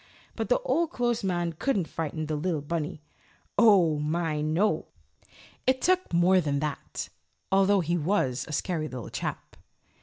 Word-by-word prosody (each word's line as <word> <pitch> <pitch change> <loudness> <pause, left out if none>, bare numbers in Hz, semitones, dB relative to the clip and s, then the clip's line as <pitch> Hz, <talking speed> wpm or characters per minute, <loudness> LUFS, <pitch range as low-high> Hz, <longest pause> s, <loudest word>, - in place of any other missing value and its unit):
But - - -3
the - - +4
Old 340 -10 +1
Clothes 240 -7 -1
Man 175 -3 -1
couldn't 195 - 0
frighten 155 -1 -3
the 155 0 -2
little 155 -1 -1
bunny. 155 -1 -3 0.5
Oh, 185 -9 +5
my 155 0 -1
no! 160 +3 +1 0.8
It 260 0 +3
took 370 +5 +1
more 180 +2 +4
than 145 -3 -1
that, 145 0 -4 0.4
although 195 0 +4
he 170 +1 0
was 140 -7 0
a - - -8
scary 155 0 -1
little 125 -5 -7
chap. - - -5
170 Hz, 150 wpm, -27 LUFS, 155-200 Hz, 0.8 s, Oh